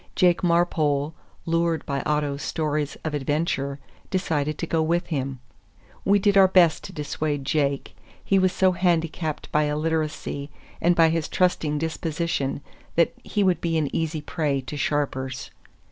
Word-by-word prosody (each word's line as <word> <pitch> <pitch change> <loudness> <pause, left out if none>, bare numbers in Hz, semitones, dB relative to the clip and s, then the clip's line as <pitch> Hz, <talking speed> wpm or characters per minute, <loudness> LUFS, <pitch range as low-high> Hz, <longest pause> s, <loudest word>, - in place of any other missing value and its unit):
Jake 180 -2 +4
Marpole, 160 -4 +2 0.3
lured 165 -1 0
by 140 -1 -2
Otto's 150 -1 0
stories 150 -2 -2
of 155 - -2
adventure, 145 -1 -1 0.3
decided 155 -5 -1
to - - -2
go 165 -1 +1
with 170 +2 +1
him. 135 -4 -2 0.6
We 200 +1 +4
did 200 0 +2
our 195 -1 +8
best 180 -4 +4
to - - -7
dissuade 150 -3 -3
Jake. 140 -1 0 0.3
He 195 - +3
was 185 -1 +3
so 185 0 +3
handicapped 165 -3 -1
by 150 0 +3
illiteracy 150 -1 -2 0.3
and 175 +1 +4
by 165 -1 +5
his 165 -1 0
trusting 165 -5 +1
disposition 160 -2 -2 0.3
that 170 -1 +3
he 205 - 0
would 185 -2 +2
be 165 -1 0
an 150 -3 -1
easy 160 -1 -1
prey 145 -2 -1
to 130 +3 -7
sharpers. 135 -3 -2
155 Hz, 150 wpm, -25 LUFS, 145-170 Hz, 0.6 s, our